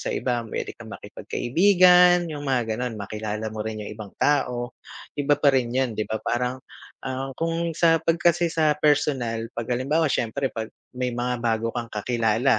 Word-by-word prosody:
sa - - -3
iba, 120 -2 -1
pwede 115 - -5
kang - - -12
makipagkaibigan 180 +3 +4
yung 145 -2 -6
mga, 120 -4 0
gano'n. 120 -2 -4
Makilala 105 +1 -4
mo 110 - -3
rin 110 0 -5
yung - - -6
ibang 105 -2 -9
tao, 125 -4 +1 0.4
iba 145 0 +1
pa 140 -2 +4
rin 125 -3 +1
yun, 130 -2 0
'di 110 - -1
ba, 110 - -1
parang, 125 +2 -1 0.5
ah, 130 +1 -3
kung 165 +1 -1
sa 165 -2 +4
'pag 165 +1 +1
kasi 175 0 +2
sa 155 -2 +2
personal 130 -6 +1
'pag 115 +1 -5
halimbawa 140 +6 +1
siyempre 130 +3 -1
pag 110 -1 -4 0.3
may 125 -1 -2
mga 125 +1 -1
bago 115 -1 0
kang 120 -1 -3
kakilala 115 +2 +1
125 Hz, 175 wpm, -24 LUFS, 115-150 Hz, 0.5 s, makipagkaibigan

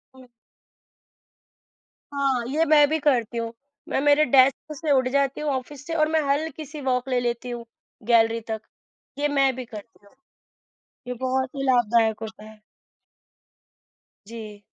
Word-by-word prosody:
हुँ। 260 -1 -15 1.9
हाँ, 270 -3 0
ये 310 +4 +2
मैं 295 -1 +6
भी 315 - +1
करती 240 -6 +1
हूँ। 230 0 -3 0.4
मैं - - 0
मेरे 290 +1 +5
डेस्क 270 +3 +4
से 310 0 -2
उठ 260 -2 +3
जाती 275 +1 0
हूँ 300 - -1
ऑफ़िस 270 +2 -5
से 330 - -3
और 310 -1 +3
मैं 320 -1 +3
हलकी-सी 300 0 -3
वॉक 255 -1 0
ले 250 - +2
लेती 240 0 -3
हूँ, 240 -1 -6 0.4
गैलरी 230 0 +4
तक। 220 -1 -3 0.6
ये 290 - +1
मैं 275 -2 +2
भी 255 -1 -6
करती 210 -1 -12
हूँ। 200 - -22 0.9
ये 250 - -2
बहुत 260 +1 -1
ही 275 - -3
लाभदायक 230 -3 +3
होता 220 -1 -8
है। 215 0 -15 1.7
जी। 215 -2 -9
260 Hz, 150 wpm, -24 LUFS, 230-290 Hz, 1.9 s, मैं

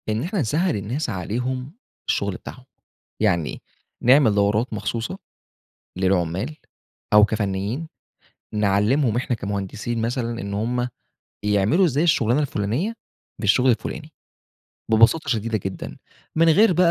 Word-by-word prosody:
إن 110 +3 0
إحنا 185 +4 -2
نسهّل 155 +8 +1
الناس 120 +9 -3
عليهم 125 - -3 0.4
الشغل 100 -1 0
بتاعهم، 130 +6 -10 0.6
يعني 85 -8 0 0.4
نعمل 125 -4 +5
دورات 105 +4 +1
مخصوصة 115 - -3 0.8
للعُمّال 95 - 0 0.6
أو 105 0 +8
كفنيين 105 +7 -2 0.7
نعلّمهم 105 +5 +2
إحنا 120 0 -1
كمهندسين 100 +3 -3
مثلًا 120 0 -2
إن 100 0 -4
هُم 120 +4 -1 0.6
يعملوا 105 - +3
إزاي 150 -1 +1
الشُغلانة 135 -5 +3
الفُلانية 135 - -1 0.5
بالشغل 125 +5 +4
الفُلاني، 150 +6 -4 0.8
ببساطة 115 +9 +4
شديدة 115 -1 0
جدًا، 95 -1 -5 0.4
من 165 +1 +5
غير 195 +6 +6
بقى 180 0 +4
115 Hz, 115 wpm, -23 LUFS, 100-135 Hz, 0.8 s, أو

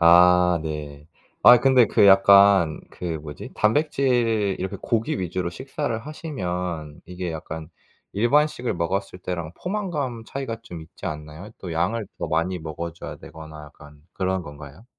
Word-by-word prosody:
아 90 0 +6
네. 75 -1 -6 0.4
아 120 0 +9
근데 130 -3 +5
그 100 - +4
약간 95 -3 +6
그 - - -10
뭐지 75 -1 -9
단백질 115 -5 +1
이렇게 95 0 -4
고기 115 -3 -1
위주로 90 -1 -2
식사를 130 - -4
하시면 90 - -5
이게 90 -1 -5
약간 80 0 -7 0.4
일반식을 125 +3 +1
먹었을 90 +3 -2
때랑 85 -3 -5
포만감 160 - -3
차이가 130 -5 -5
좀 85 -8 -9
있지 85 +4 -10
않나요? 75 +4 -7
또 90 -3 -6
양을 95 +6 -1
더 - - -3
많이 85 +3 0
먹어줘야 85 +1 -7
되거나 80 -1 -11
약간 75 0 -16
그런 95 -1 -1
건가요? 75 +5 -11
90 Hz, 290 characters per minute, -24 LUFS, 80-115 Hz, 0.4 s, 아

